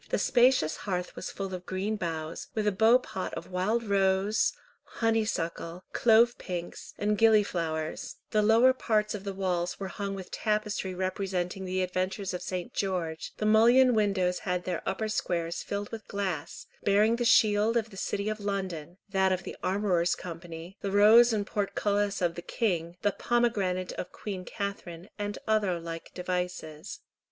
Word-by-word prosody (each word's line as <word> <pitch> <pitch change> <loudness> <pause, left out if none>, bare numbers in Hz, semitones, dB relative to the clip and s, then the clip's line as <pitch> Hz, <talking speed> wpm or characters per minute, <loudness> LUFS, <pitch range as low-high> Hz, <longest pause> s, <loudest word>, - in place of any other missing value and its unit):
The - - +1
spacious 245 - +3
hearth 180 -3 -3
was - - -5
full 195 -1 -5
of 180 -1 -7
green 195 +3 -1
boughs, 165 -4 -4
with 215 -1 0
a 210 - +3
beaupot 220 -1 +2
of - - -8
wild 210 +6 0
rose, 195 0 +2 0.3
honeysuckle, 190 -6 -2
clove 235 +1 +4
pinks 175 -2 -6
and 210 0 0
gilliflowers; 170 -8 +1 0.2
the 215 - +3
lower 225 +5 +5
parts 215 -4 0
of 205 -1 -6
the 200 - -2
walls 180 -2 -1
were 195 -1 -4
hung 200 +2 -4
with 190 -2 -8
tapestry 210 -3 -1
representing 185 0 -2
the 185 0 0
adventures 185 +1 -2
of 180 - -4
St. 180 -2 -4
George; 175 -5 -2
the 215 - -2
mullioned 235 +4 +6
windows 195 -4 +1
had 180 -2 -2
their 180 -2 -2
upper 205 +3 -2
squares 170 -5 -2
filled 205 0 -4
with 225 -1 -7
glass, 190 -7 -4 0.2
bearing 210 +3 +4
the 240 - -1
shield 220 -1 +4
of 225 -1 -2
the - - -11
City 200 +1 -2
of 215 0 -2
London, 190 -5 -4
that 190 -1 +2
of 185 0 -1
the - - -7
Armourers' 185 -3 +1
Company, 170 +1 -8
the 200 - -2
rose 215 +4 +7
and 210 -2 0
portcullis 205 -1 -1
of 170 -1 +2
the 175 - -7
King, 175 -4 -2
the 205 - +3
pomegranate 200 -7 0
of - - -5
Queen 190 -3 -6
Catharine, 195 -3 -5
and 205 0 -3
other 205 -5 +2
like 165 0 -7
devices. 180 -3 -4
195 Hz, 165 wpm, -29 LUFS, 180-215 Hz, 0.3 s, rose